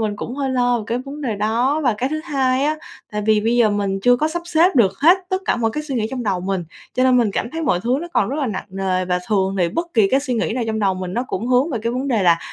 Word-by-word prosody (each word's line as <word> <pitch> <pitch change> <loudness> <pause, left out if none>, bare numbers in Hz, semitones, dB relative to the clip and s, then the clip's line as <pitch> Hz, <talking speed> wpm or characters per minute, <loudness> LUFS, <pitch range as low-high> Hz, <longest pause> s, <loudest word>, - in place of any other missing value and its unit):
mình 210 -2 -1
cũng 240 +4 -5
hơi 275 -2 -1
lo 245 -1 +2
về 215 - -6
cái 235 +2 -1
vấn 275 +3 -8
đề 240 -7 -2
đó. 240 +8 +1
Và 240 -4 +3
cái 260 - 0
thứ 310 +1 -3
hai 265 -3 +1
á, 305 +1 +1 0.4
tại 210 - -2
vì 215 -1 +4
bây 230 +3 +1
giờ 225 -3 +4
mình 200 -1 -1
chưa 245 0 +5
có 305 +5 0
sắp 345 +2 -4
xếp 345 0 +3
được 200 -6 +4
hết 345 +6 +6
tất 375 - 0
cả - - +1
mọi 225 -2 0
cái 300 +6 -4
suy 285 -3 -5
nghĩ 220 -3 0
trong 260 -2 -4
đầu 195 -5 -1
mình, 185 -2 -2 0.3
cho 255 - +2
nên 255 -1 +4
mình 230 -4 +3
cảm 235 - -2
thấy 325 0 -4
mọi 185 - +1
thứ 245 +5 0
nó 345 - -6
còn 205 - +2
rất 275 - -3
là 290 -4 -1
nặng 205 -4 -4
nề, 190 -1 -1
và 180 0 0
thường 195 -2 0
thì 175 -1 +2
bất 335 - -2
kỳ 210 -4 +4
cái 270 - +3
suy 255 -3 -2
nghĩ 220 - -1
nào 245 -1 -1
trong 220 0 -2
đầu 195 -3 +1
mình 185 0 -5
nó 245 +2 -1
cũng 220 +6 -3
hướng 255 +5 +3
về 235 - -2
cái 230 - -1
vấn 260 +3 -2
đề 225 -6 +1
là, 170 -2 +4
240 Hz, 320 wpm, -20 LUFS, 205-270 Hz, 0.4 s, hết